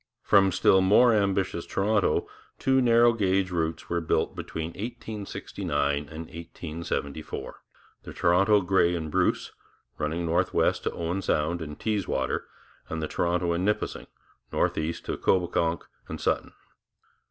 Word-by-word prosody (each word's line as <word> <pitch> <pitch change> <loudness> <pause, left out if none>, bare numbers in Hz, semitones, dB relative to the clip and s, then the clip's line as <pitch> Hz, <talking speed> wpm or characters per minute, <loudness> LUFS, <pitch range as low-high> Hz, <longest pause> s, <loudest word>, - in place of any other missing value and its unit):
From 95 -1 +5
still 95 +2 +4
more 105 +6 +5
ambitious 95 -4 +1
Toronto 105 +1 +1 0.3
two 130 0 +2
narrow 120 -1 +5
gauge 95 -3 +1
routes 80 -2 -2
were 85 0 -1
built 80 - 0
between 80 0 -5
1869 100 - -3
and 80 0 -7
1874 80 -2 -6 0.4
the - - -9
Toronto, 100 +4 +3
Grey 90 -1 +2
and 80 -2 -4
Bruce - - +1 0.5
running 80 +3 -1
northwest 85 +3 +1
to - - +1
Owen 85 +3 -3
Sound 85 0 0
and 75 -1 -7
Teeswater, 100 -11 -1 0.4
and 80 - -3
the 80 - -2
Toronto 85 +1 0
and 85 +2 0
Nipissing 105 +2 -1 0.4
northeast 80 +2 -1
to - - -2
Coboconk 85 -2 +1 0.2
and - - -6
Sutton. - - -1
90 Hz, 130 wpm, -27 LUFS, 80-100 Hz, 0.5 s, From